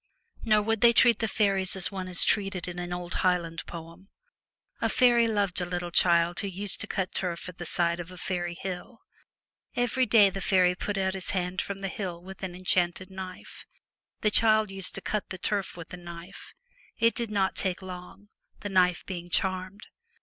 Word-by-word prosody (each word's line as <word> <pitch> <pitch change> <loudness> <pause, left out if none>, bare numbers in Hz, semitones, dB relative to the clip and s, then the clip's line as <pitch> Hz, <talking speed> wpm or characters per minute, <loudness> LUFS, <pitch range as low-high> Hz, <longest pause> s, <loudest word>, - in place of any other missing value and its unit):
Nor 215 -2 +3
would 225 0 0
they 235 0 +7
treat 235 0 +5
the 225 - 0
faeries 195 -3 +2
as 190 0 +2
one 190 -2 -5
is 180 -1 +4
treated 195 -4 0
in 175 0 -5
an 175 0 -5
old 175 0 -4
Highland 170 -3 0
poem. 170 +3 -10 0.7
A - - +2
faery 240 -2 +4
loved 200 -5 0
a - - -1
little 175 0 -4
child 170 0 +4
who 200 - -2
used 195 +1 -2
to - - -3
cut 190 -1 -2
turf 175 -2 -3
at 180 -1 -10
the 175 - -5
side 170 +1 +1
of 175 0 -6
a 180 - -11
faery 175 -1 -3
hill. 190 +5 -6 0.7
Every 245 +1 +1
day 205 -4 +6
the 195 - -5
faery 180 -1 +3
put 200 +2 -3
out 190 -1 0
his 190 -1 -1
hand 180 +1 -1
from 195 -1 -6
the 195 - -2
hill 185 -3 -5
with 190 +1 -10
an 185 -2 -5
enchanted 180 0 0
knife. 190 -1 -9 0.5
The 210 - +2
child 215 -2 +4
used 195 -1 -3
to - - -4
cut 210 -1 -3
the 190 - -5
turf 195 0 -2
with 165 -2 -9
the 180 - -8
knife. 170 +1 -11 0.4
It 230 0 +3
did 235 -2 -3
not 195 -2 0
take 190 0 -1
long, 185 +2 -10 0.3
the 205 - -4
knife 180 -2 +2
being 175 -2 -6
charmed. 185 +3 -1
185 Hz, 200 wpm, -28 LUFS, 175-200 Hz, 0.7 s, they